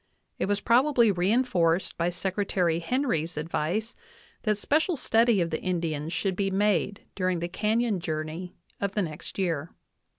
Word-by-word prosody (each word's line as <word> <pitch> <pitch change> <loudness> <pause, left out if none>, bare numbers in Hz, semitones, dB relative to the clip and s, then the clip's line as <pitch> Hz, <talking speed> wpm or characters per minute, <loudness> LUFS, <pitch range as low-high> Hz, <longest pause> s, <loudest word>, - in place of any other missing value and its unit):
it - - 0
was 205 0 +1
probably 240 -1 +4
reinforced 185 -3 +2
by 170 +1 0
Secretary 185 -2 0
Henry's 170 - -1
advice 170 +8 -2 0.5
that 215 -2 +1
special 315 - +1
study 230 -4 +3
of 170 - -1
the 155 - -2
Indians 165 -4 -2
should 190 +1 -1
be 195 +1 0
made 200 0 +1
during 185 -2 0
the 170 +1 -2
canyon 215 +2 0
journey 160 +2 -4 0.2
of 200 -1 -1
the 205 - +1
next 155 -3 -7
year. 170 -5 -2
190 Hz, 145 wpm, -27 LUFS, 170-215 Hz, 0.5 s, probably